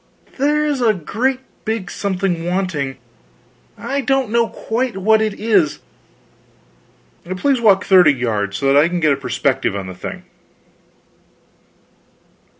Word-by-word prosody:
_ - - -22
There 295 +2 +1
is 290 -3 -1
a 220 -3 +3
great 250 - -2 0.2
big 220 -4 -3
something 190 -4 -2
wanting, 175 -7 -2 0.8
I 280 +1 -2
don't 240 -4 +1
quite 240 +1 -2
know - - -5
what 220 +2 +4
it 215 -2 -2
is. 200 -9 +2 1.6
Please 270 +3 +1
walk 200 -3 +4
thirty 180 -5 +6
yards, 105 -7 -2
so 140 - -4
that 135 +1 +4
I 165 - +1
can 175 0 -2
get 155 -3 +3
a - - 0
perspective 135 -3 -1
on 100 -1 -4
the 95 - -7
thing.... 90 - -8
195 Hz, 140 wpm, -18 LUFS, 145-235 Hz, 1.6 s, thirty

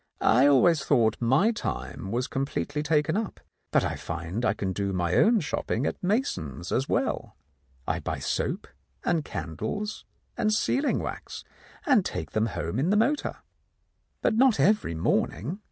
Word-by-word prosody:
I 125 +5 +5
always 145 +2 +5
thought 115 -6 +3
my 135 - +4
time 210 - -4
was 120 +4 0
completely 135 +2 -2
taken 150 +1 +1
up, 220 -1 -3 0.3
but - - +3
I - - -1
find 85 +7 -4
I - - +2
can 95 -2 -2
do 100 0 -2
my 90 -1 0
own 225 - +4
shopping 145 -4 -2
at - - -3
Mason's 180 - -1
as 135 - 0
well. - - -1 0.5
I - - 0
buy - - -3
soap - - -2 0.4
and 165 -3 +1
candles 145 - -4 0.3
and 215 -3 +1
sealing 270 +6 +1
wax, - - -6 0.4
and 260 - +4
take 80 - -4
them 110 +1 +1
home 90 +2 -3
in 155 +6 +1
the 210 - +3
motor." 270 +7 0 0.8
"But - - +3
not 250 0 +4
every 210 - +3
morning?" 125 - 0
145 Hz, 155 wpm, -27 LUFS, -, 0.8 s, I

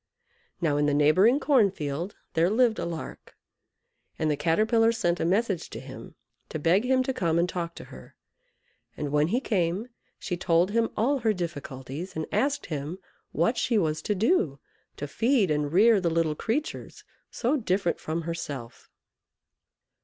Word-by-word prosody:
Now 150 -4 +1
in 145 0 +2
the 145 - +2
neighbouring 185 - +4
corn 260 -10 +4
field 160 +2 -4 0.2
their 165 +2 +3
lived 230 +1 +2
a 170 - -2
Lark, 165 -2 -7 0.8
and 155 -1 0
the - - +1
Caterpillar 215 +9 +3
sent 175 -6 0
a - - 0
message 195 0 0
to - - -7
him, - - -11 0.3
to - - -4
beg 170 +7 +3
him 260 0 +3
to 265 - -2
come 170 -9 0
and 170 +1 +2
talk 170 -2 -4
to - - -9
her, 65 - -13 0.8
and 145 -2 -3
when 150 +1 +3
he 235 +8 +1
came 195 -1 -1 0.3
she 180 - -3
told 175 +1 +2
him 230 +1 +1
all 270 +5 +2
her 220 -2 +2
difficulties, 150 -2 -6
and 160 0 -2
asked 280 +7 0
him 150 +3 -4 0.3
what 200 +10 +1
she 235 -1 +1
was 155 -5 0
to 210 - -1
do 195 - +1 0.4
to 145 - -4
feed 225 - +2
and 150 -1 0
rear 210 +3 +5
the 170 - +1
little 165 -1 +1
creatures 245 - -4 0.3
so 255 +5 0
different 195 - 0
from 165 +2 -3
herself. 145 -7 -6
175 Hz, 170 wpm, -27 LUFS, 155-225 Hz, 0.8 s, rear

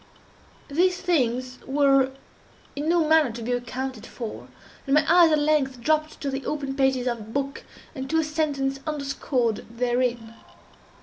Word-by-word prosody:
These 360 +5 +2
things 255 -7 0
were 275 -1 +4 0.7
in 295 +3 -2
no 335 -2 +3
manner 315 -5 +4
to 230 0 -7
be 245 - -2
accounted 245 -1 -3
for, 230 -3 -7 0.4
and 275 - +3
my 305 0 +4
eyes 340 -1 +6
at 305 - +4
length 295 -4 +1
dropped 310 +4 0
to 280 - -2
the 270 0 -4
open 275 -3 -3
pages 265 -2 +2
of 240 -2 -1
a - - -8
book, 275 +6 -4 0.3
and 265 -3 -6
to 320 - +1
a 320 - +3
sentence 290 -3 -1
underscored 270 -6 -1
therein. 240 -1 -1
275 Hz, 160 wpm, -25 LUFS, 250-305 Hz, 0.7 s, eyes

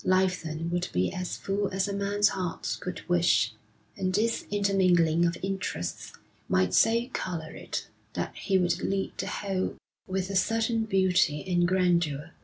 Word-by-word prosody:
Life 185 0 +2
then 160 +1 -4
would 175 0 -1
be 90 +1 0
as 180 -1 -3
full 200 +1 -1
as 190 +1 -1
a 200 - -3
man's 200 +1 +2
heart 180 -3 -3
could 180 - -6
wish; 115 -11 +3 0.4
and 185 -1 -1
this 230 +3 +1
intermingling 180 -5 +3
of 170 - -2
interests 190 - -3 0.4
might 90 0 +2
so 230 - +4
colour 165 -4 -3
it - - -5 0.3
that - - -3
he 195 - +1
would 180 -2 +1
lead 195 0 -1
the - - -2
whole 190 -2 -2 0.3
with 190 0 -2
a - - -3
certain 225 +3 +1
beauty 185 -7 +2
and 175 -1 +2
grandeur. 175 -6 +1
185 Hz, 160 wpm, -28 LUFS, 170-195 Hz, 0.4 s, so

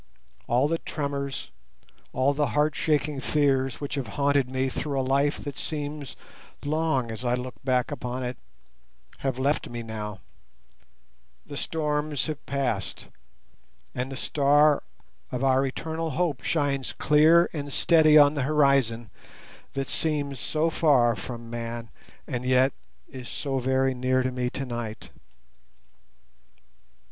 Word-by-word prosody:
All 125 +4 +3
the 165 +1 0
tremors, 140 -2 -4 0.6
all 130 +2 +2
the 145 0 +1
heart 150 +1 +3
shaking 150 -2 0
fears 135 -3 +1
which 145 - -4
have 135 -5 -2
haunted 140 -2 +2
me 130 0 0
through 140 +1 -2
a - - +1
life 140 +2 +2
that 145 -1 -6
seems 145 -2 -5 0.5
long 145 -6 0
as 110 +2 -6
I 120 0 +2
look 125 0 -5
back 125 -2 +1
upon 125 +1 -4
it, 125 0 -3 0.8
have 135 -2 -2
left 140 +3 0
me 120 0 -5
now; 105 -3 -6 1.3
the 145 - -8
storms 150 -1 -1
have 155 -2 -5
passed, 135 -8 -2 0.8
and 125 +2 -3
the - - -4
Star 145 +2 +4 0.5
of 125 +1 -2
our 135 0 +4
Eternal 160 +4 -3
Hope 155 -2 -1
shines 140 -4 0
clear 160 +3 +5
and 145 -3 -4
steady 155 0 +5
on 145 -1 +7
the 145 - -1
horizon 135 -5 +2 0.6
that 135 -1 -2
seems 145 -4 -1
so 160 +5 0
far 130 -8 +4
from 115 +4 -7
man, 115 -1 -5 0.3
and 125 -3 -3
yet 130 +1 +3 0.3
is 130 -2 -9
so 135 -2 -2
very 130 +1 +2
near 130 0 +1
to 130 - -1
me 125 -1 -1
tonight. 120 -5 -5
135 Hz, 135 wpm, -26 LUFS, 125-150 Hz, 1.3 s, on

